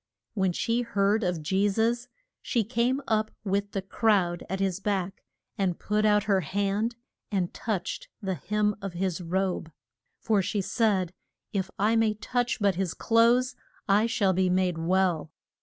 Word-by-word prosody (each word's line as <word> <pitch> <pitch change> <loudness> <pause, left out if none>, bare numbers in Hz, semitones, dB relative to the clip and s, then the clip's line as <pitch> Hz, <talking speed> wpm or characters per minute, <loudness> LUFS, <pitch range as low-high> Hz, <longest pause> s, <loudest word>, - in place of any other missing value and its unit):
When 190 -3 +1
she 230 +7 0
heard 210 -1 +1
of 175 -4 -1
Je 195 +6 +2
sus 230 +4 0 0.3
she 235 -3 0
came 245 +5 0
up 215 -1 +1
with 200 0 -1
the 195 - -2
crowd 190 -4 +1
at 190 +1 -2
his 195 -1 0
back, 195 -2 -2 0.4
and 185 -3 +1
put 210 +1 0
out 210 -1 +4
her 200 -3 +2
hand 205 +5 -1 0.4
and 185 -4 -1
touched 200 -5 -3
the 195 -4 -2
hem 210 +3 0
of 195 -2 -5
his 185 0 -2
robe. 180 -1 -1 0.5
For, 215 -3 +2
she 200 +2 -1
said, 195 -3 +1 0.4
if 190 -2 -1
I 215 +3 +2
may 225 -1 +2
touch 245 +3 -1
but 200 -2 +3
his 180 -1 -2
clothes 235 +2 +3 0.3
I 210 +3 +4
shall 200 -4 +2
be 185 0 +2
made 180 -2 +1
well. 170 -3 +1
200 Hz, 160 wpm, -27 LUFS, 185-220 Hz, 0.5 s, out